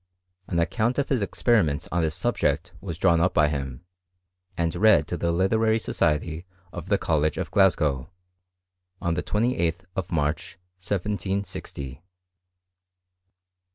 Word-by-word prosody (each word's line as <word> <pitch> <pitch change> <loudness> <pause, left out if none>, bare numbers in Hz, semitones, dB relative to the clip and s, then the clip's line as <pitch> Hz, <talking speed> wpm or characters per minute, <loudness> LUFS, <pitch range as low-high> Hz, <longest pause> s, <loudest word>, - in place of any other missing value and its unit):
An 85 - -2
account 110 +8 +1
of 140 - 0
his 130 -5 +1
experiments 100 -6 +1
on 85 - +1
this 80 -2 0
subject 80 +5 0
was 85 -5 -5
drawn 85 -2 +3
up 90 +1 +1
by 75 -1 +4
him, 70 +1 -5 0.7
and 85 -1 0
read 110 +3 +5
to - - -3
the 85 0 0
literary 110 +6 +2
society 80 -5 -1 0.3
of - - -7
the - - +4
College 75 -1 0
of - - -3
Glasgow, 80 -9 +2 0.9
on 85 - 0
the - - -1
28th 95 -6 0
of 95 -3 -3
March, 75 +3 -1 0.2
1760. 100 -6 -3
Dr. - - -33
85 Hz, 135 wpm, -25 LUFS, 80-100 Hz, 0.9 s, read